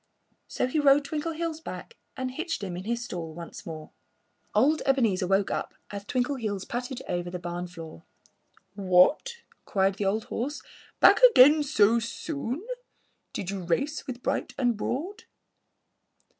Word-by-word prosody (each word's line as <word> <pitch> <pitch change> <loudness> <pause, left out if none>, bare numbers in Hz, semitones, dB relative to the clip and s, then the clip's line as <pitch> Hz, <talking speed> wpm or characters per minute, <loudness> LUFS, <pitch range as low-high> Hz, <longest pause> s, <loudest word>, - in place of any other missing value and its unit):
So - - -1
he 255 +5 0
rode 285 0 +5
Twinkleheels 320 +2 -3
back 475 - -8 0.2
and 260 -1 -3
hitched 330 -2 -4
him 185 -3 -4
in 180 +2 -7
his 235 +1 -2
stall 165 -6 -6
once 170 +1 -9
more. 155 -2 -8 0.6
Old 280 +9 +4
Ebenezer 225 -9 +2
woke 195 +1 +2
up - - -3 0.2
as 200 -1 -6
Twinkleheels 240 -6 -2
pattered 250 +1 -4
over 175 0 -2
the 180 - -4
barn 175 0 -5
floor. 165 - -10 0.7
"What!" 195 - +3 0.3
cried 195 0 +1
the 205 - -1
old 210 +3 +1
horse. 280 +6 -4 0.4
"Back - - +7
again 305 - +8
so 235 -6 +3
soon? 280 - -4 0.7
Did 190 - -4
you 195 -1 -4
race 270 - -1
with 245 -2 -6
Bright - - -2
and 245 -3 +2
Broad?" 340 - -4
235 Hz, 145 wpm, -27 LUFS, 185-285 Hz, 0.7 s, again